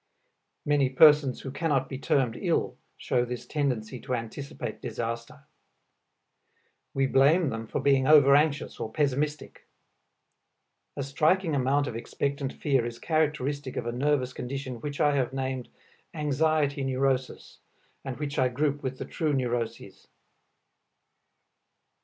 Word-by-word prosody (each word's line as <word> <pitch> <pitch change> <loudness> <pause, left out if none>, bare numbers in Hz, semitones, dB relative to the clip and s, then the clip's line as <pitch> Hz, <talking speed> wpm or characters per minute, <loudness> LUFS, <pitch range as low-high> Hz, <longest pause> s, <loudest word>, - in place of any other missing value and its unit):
Many 145 -3 +2
persons 145 -1 +5
who 135 - -6
cannot 140 -3 0
be 135 - -6
termed 130 -5 +1
ill - - -1 0.2
show 120 - 0
this 125 0 -5
tendency 130 -5 -2
to 130 0 -3
anticipate 120 +4 -6
disaster. 115 +3 -5 1.5
We 135 0 +2
blame 140 +5 +4
them 115 -1 -5
for - - -2
being 135 -1 +3
over 145 -2 +7
anxious 145 0 +1
or 110 - -4
pessimistic. 150 +2 -2 1.3
A 140 - -2
striking 155 +5 +1
amount 140 +1 +2
of 115 - -5
expectant 140 +3 -3
fear 135 -5 0
is 120 0 -5
characteristic 145 -3 -1
of - - -2
a 120 - -1
nervous 130 0 0
condition 130 -2 -5
which 145 +1 -5
I 145 -1 +3
have 130 -2 0
named 130 -2 -3 0.5
"anxiety 150 -1 +1
neurosis," 130 -1 -1 0.4
and 130 -2 -5
which 145 -1 -3
I 130 - +4
group 145 +3 -1
with 130 -1 -4
the - - -5
true 155 -2 -1
neuroses. 120 -3 -3
135 Hz, 130 wpm, -27 LUFS, 125-145 Hz, 1.5 s, over